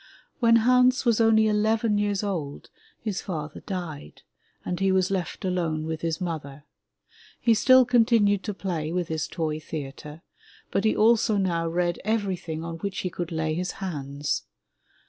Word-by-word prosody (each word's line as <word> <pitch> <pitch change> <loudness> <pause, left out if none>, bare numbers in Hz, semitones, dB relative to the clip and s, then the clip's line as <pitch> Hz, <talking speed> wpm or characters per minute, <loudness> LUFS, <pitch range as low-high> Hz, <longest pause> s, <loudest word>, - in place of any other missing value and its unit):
When 230 -2 +5
Hans 250 +3 +4
was 230 -1 +3
only 220 -1 +5
eleven 215 0 +2
years 205 -1 0
old 165 -9 -4 0.3
his 205 -5 -3
father 155 -5 -5
died 165 - -7 0.4
and 180 - -3
he 195 0 +2
was 190 0 +2
left 190 +1 -3
alone 165 -4 -1
with 160 0 -4
his 165 -1 -2
mother. 150 -5 -5 0.8
He 230 - +4
still 255 +3 +6
continued 225 -5 +3
to 210 - -2
play 165 -6 -3
with 175 -1 -2
his 160 -1 -2
toy 155 -2 -3
theatre, 150 0 -8 0.5
but 195 - 0
he 215 - +3
also 220 -1 +3
now 170 -4 0
read 175 +1 0
everything 190 -7 -2
on 165 0 -5
which 200 +2 -4
he 185 - -3
could 175 0 -5
lay 160 -1 -1
his 180 +2 -2
hands. 145 -6 -3
180 Hz, 160 wpm, -26 LUFS, 160-215 Hz, 0.8 s, still